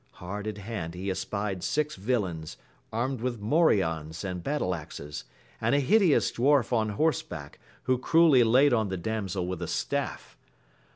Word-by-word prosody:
Hard 100 +4 -6
at 105 -1 -4
hand 100 -5 -5
he 95 +2 -3
espied 100 -1 -3
six 150 +10 0
villains, 95 -7 -2 0.3
armed 120 +2 -2
with 120 -2 -2
morions 95 - +1
and 90 -2 -4
battle 140 -11 -1
axes, 75 -2 -7 0.4
and - - +2
a - - +4
hideous 175 +3 +4
dwarf 135 0 +2
on 110 -2 +2
horseback, 150 - -2 0.2
who 130 0 +1
cruelly 155 -2 +5
laid 130 +4 +5
on 110 -4 +1
the 95 - -2
damsel 95 -2 -2
with 90 -1 -4
a 85 - -3
staff. - - -3
105 Hz, 155 wpm, -28 LUFS, 90-130 Hz, 0.4 s, cruelly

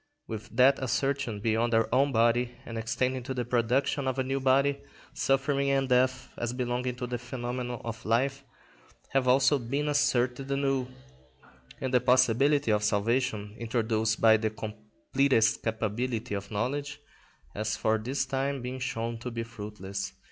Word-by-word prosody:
With 110 -1 -7
that 135 +2 +5
assertion 130 -3 -1
beyond 115 +1 +1
our 115 0 +3
own 140 +2 +3
body 120 +1 +2
and 115 - -7
extending 125 +3 -1
to 130 +2 -5
the 125 -1 -2
production 125 +4 +1
of 130 0 -1
a 130 - +1
new 135 +1 -1
body, 140 +1 +2 0.3
suffering 140 +1 +1
and 135 -1 +2
death, 130 0 +2
as 120 0 -2
belonging 125 0 -2
to 125 - -4
the 120 0 -4
phenomenon 120 0 -4
of 115 -1 -6
life, 135 +5 0 0.7
have 135 -2 +1
also 130 +2 +4
been 140 +5 -2
asserted 135 -2 +1
anew, 135 -2 0 0.9
and 130 - -3
the 125 - +5
possibility 130 +2 +3
of 105 -1 +2
salvation, 105 0 0
introduced 110 -1 0
by 110 -1 +6
the 110 0 -1
completest 110 - 0
capability 115 +1 -2
of 100 0 -4
knowledge, 140 +7 -2 0.5
has 110 +1 -2
for 110 0 +1
this 130 +4 -1
time 135 +1 -1
been 130 +1 -4
shown 115 -2 -3
to 125 - -5
be 115 -1 -4
fruitless. 105 -4 -6
125 Hz, 155 wpm, -28 LUFS, 115-135 Hz, 0.9 s, by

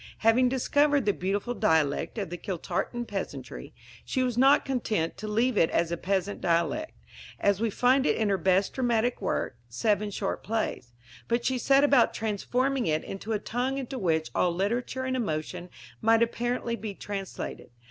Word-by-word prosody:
Having 250 +3 +5
discovered 285 +1 +2
the 205 - +3
beautiful 200 +6 -2
dialect 160 -3 +1
of 195 -6 -3
the 175 - -4
Kiltartan 210 +6 -3
peasantry, 200 -3 -6 0.3
she 260 - -1
was 250 -2 -1
not 270 +4 +5
content 220 -11 -1
to 215 - -6
leave 230 +2 +1
it 165 - +4
a 170 0 +1
peasant 195 +2 -2
dialect 175 - 0 0.5
as 200 0 +2
we 230 - +2
find 255 +6 +3
it - - +3
in 220 -2 +1
her 195 - +2
best 190 +3 +2
dramatic 240 -1 0
work, 120 - -2
Seven 205 - 0
Short 195 -1 -3
Plays; 215 - -3 0.3
but 235 0 0
she 260 -1 +1
set 275 +3 +4
about 275 -4 +4
transforming 245 +4 0
it 155 0 +1
into 195 +3 -6
a - - +2
tongue 250 +5 -2
into 265 -1 -4
which 160 -5 0
all 180 - +2
literature 235 +8 -1
and 260 0 -1
emotion 175 -4 -3 0.3
might 225 +1 +5
apparently 235 0 -1
be 210 -2 -6
translated. 195 -1 -6
220 Hz, 170 wpm, -28 LUFS, 190-250 Hz, 0.5 s, Having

